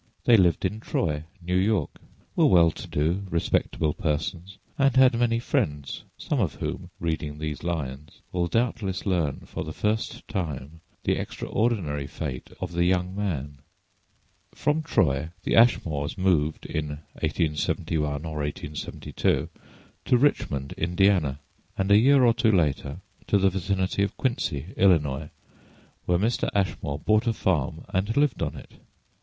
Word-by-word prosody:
They 120 - +7
lived 90 -3 +3
in 105 +4 -1
Troy, 75 -8 -1 0.2
New 90 +1 -1
York, 95 -4 +1 0.4
were - - +5
well 85 -3 +6
to - - -9
do, 80 +6 0
respectable 80 -2 0
persons, 85 +3 -3 0.2
and 135 -2 +3
had 130 -1 +6
many 115 0 +2
friends, 100 - -2
some - - -2
of - - 0
whom, - - -4
reading 80 -3 -2
these 75 -1 -4
lines, 75 -4 -4
will 90 -1 0
doubtless 110 -3 -1
learn 85 -8 0
for - - -6
the 80 - -6
first 110 +1 -2
time 80 - -4 0.2
the - - +1
extraordinary 90 -11 -1
fate 65 -5 -5
of - - -4
the 85 0 +2
young 90 +1 +1
man. 75 -9 -3 1.0
From 150 +2 +1
Troy 75 - +1
the - - +1
Ashmores 80 -11 +3
moved 85 -5 +1
in 75 -1 -3 0.3
1871 75 -1 -1
or 80 -1 -5
1872 75 0 -2 0.6
to 125 - +4
Richmond, 70 - +1
Indiana, 85 -5 +2 0.4
and 95 +1 0
a 100 - +8
year 135 +3 +5
or 115 - +5
two 115 -2 +3
later 75 -3 0 0.3
to 100 - +4
the 95 -1 +3
vicinity 95 +1 -1
of 100 - -1
Quincy, 95 - -2
Illinois, 75 -6 +3 0.8
where 90 - +3
Mr. 110 +6 0
Ashmore 95 -7 -1
bought 110 - +2
a 115 - +3
farm 80 -6 -1
and 100 +5 -1
lived 145 -3 +2
on - - -1
it. - - -11
85 Hz, 145 wpm, -26 LUFS, 75-105 Hz, 1.0 s, a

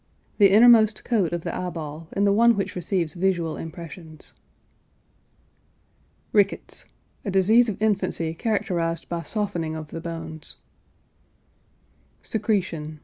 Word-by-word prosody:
The 200 -1 +7
innermost 220 0 +6
coat 205 -9 +1
of 175 -1 -2
the - - -4
eye 180 - -3
ball 160 -1 -7
and 200 - +1
the 200 - +4
one 235 +2 +5
which 195 - -2
receives 175 -3 -1
visual 175 -3 0
impressions. 165 0 -9 2.0
RICKETS. 200 -2 +1 0.4
A - - -3
disease 215 +5 +4
of 200 - -5
infancy 185 -6 0
characterized 170 -4 -1
by 170 -1 -2
softening 170 -6 -3
of 155 -1 -7
the 165 - -6
bones. 165 -2 -6 1.7
SECRETION. 180 -8 -2
180 Hz, 120 wpm, -24 LUFS, 165-205 Hz, 2.0 s, The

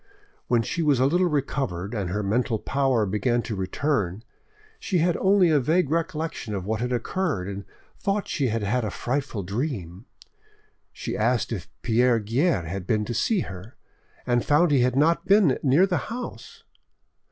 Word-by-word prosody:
When 120 -2 +2
she 170 - -2
was 145 -5 +3
a 130 - +4
little 175 +6 +3
recovered 135 - -2
and 100 -6 -2
her 105 +3 -2
mental 115 +3 0
power 130 -2 +1
began 120 +5 0
to 110 - -4
return, 100 - -1 0.6
she 190 - -1
had 170 0 +2
only 190 -3 +4
a 150 - +4
vague 155 +3 +1
recollection 160 - -2
of 95 -2 -4
what 110 +2 -2
had 125 +1 -1
occurred, 125 - -1
and 100 0 -6 0.3
thought 200 0 -1
she 140 - 0
had 115 -1 -1
had 120 +5 0
a 110 - -1
frightful 125 -1 -3
dream. 100 - -4 0.9
She - - -5
asked 120 +2 +1
if 100 -7 -5
Pierre 120 +1 +3
Guerre 115 - +1
had 90 +2 -5
been 110 -2 +1
to 120 - -4
see 190 - +1
her, 95 - -8 0.5
and 120 -1 +1
found 150 +3 +3
he 140 - +4
had 125 0 +2
not 165 +4 +2
been 195 -9 +4
near 145 +7 +4
the 185 -2 0
house. 245 +1 -7
125 Hz, 175 wpm, -25 LUFS, 105-155 Hz, 0.9 s, a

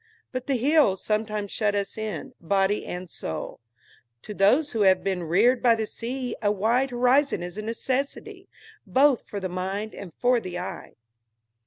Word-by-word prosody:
But 255 -1 -5
the 275 - +1
hills 260 -6 +3
sometimes 210 -1 -1
shut 210 -2 0
us 200 -1 -2
in, 220 +4 -5
body 195 +3 +1
and 180 +1 -5
soul. 80 - -6 0.6
To 210 - -7
those 245 +10 +3
who 225 - -1
have 190 -2 +4
been 190 -2 -1
reared 210 +10 +3
by 235 -2 +5
the 220 -1 -2
sea 245 +3 -5
a 205 -2 +2
wide 230 +6 +1
horizon 255 -1 +2
is 175 0 -7
a 215 - -4
necessity, 275 - -3 0.4
both 270 -1 +3
for 205 - -5
the 190 - -3
mind 190 +4 -4
and 195 -4 -9
for 245 +6 +2
the 180 -5 -6
eye. 180 - -7
215 Hz, 170 wpm, -25 LUFS, 195-255 Hz, 0.6 s, by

